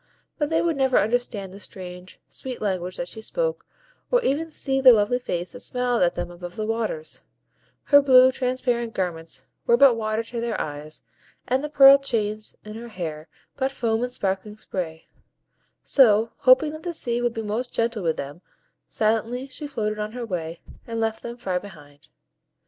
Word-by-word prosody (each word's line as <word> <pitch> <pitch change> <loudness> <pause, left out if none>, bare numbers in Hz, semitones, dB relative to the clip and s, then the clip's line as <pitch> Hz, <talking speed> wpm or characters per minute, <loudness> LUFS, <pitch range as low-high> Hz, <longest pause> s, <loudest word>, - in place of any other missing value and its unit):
But 295 -1 0
they 320 - +2
would 335 -4 0
never 265 -2 +3
understand 215 -4 -1
the 200 - -10
strange, 180 -2 -9
sweet 255 -2 -6
language 185 -3 -2
that 175 - -4
she 220 - -7
spoke, - - -2 0.4
or - - +4
even 320 +1 0
see 270 -3 -1
the 255 -2 +9
lovely 220 +3 +2
face 175 -7 -4
that - - -10
smiled 250 -1 0
at 175 -1 +3
them 175 - -4
above 175 0 -9
the 215 - -3
waves; 215 -9 -3 0.6
her 285 0 +6
blue, 260 -2 +7
transparent 250 -3 -1
garments 165 -7 -4 0.2
were 235 - +5
but 275 -2 +7
water 220 0 -2
to 230 +1 -5
their 235 -2 -2
eyes, 150 +1 -6 0.4
and 260 +3 +1
the 300 - -3
pearl 275 -1 +8
chains 215 -5 -2
in 215 - -8
her 230 +2 -8
hair 165 -7 -6 0.3
but 265 -1 +1
foam 230 -4 -1
and 245 0 -2
sparkling 205 -2 -3
spray; 165 -6 -5 0.8
so, 225 -4 +4
hoping 265 +4 +5
that 310 +1 -8
the 345 -1 -4
sea 240 -4 0
would 240 -1 0
be 225 - -3
most 225 +4 -3
gentle 230 -2 -1
with 165 -3 0
them, 145 +5 -7 0.5
silently 225 +4 0
she 275 +2 -7
floated 215 -6 -3
on 210 +1 -4
her 245 -1 -5
way, 170 -5 -5 0.3
and 230 -1 -3
left 225 0 -1
them 235 0 -7
far 185 -6 -2
behind. 150 -6 -14
225 Hz, 185 wpm, -24 LUFS, 185-255 Hz, 0.8 s, the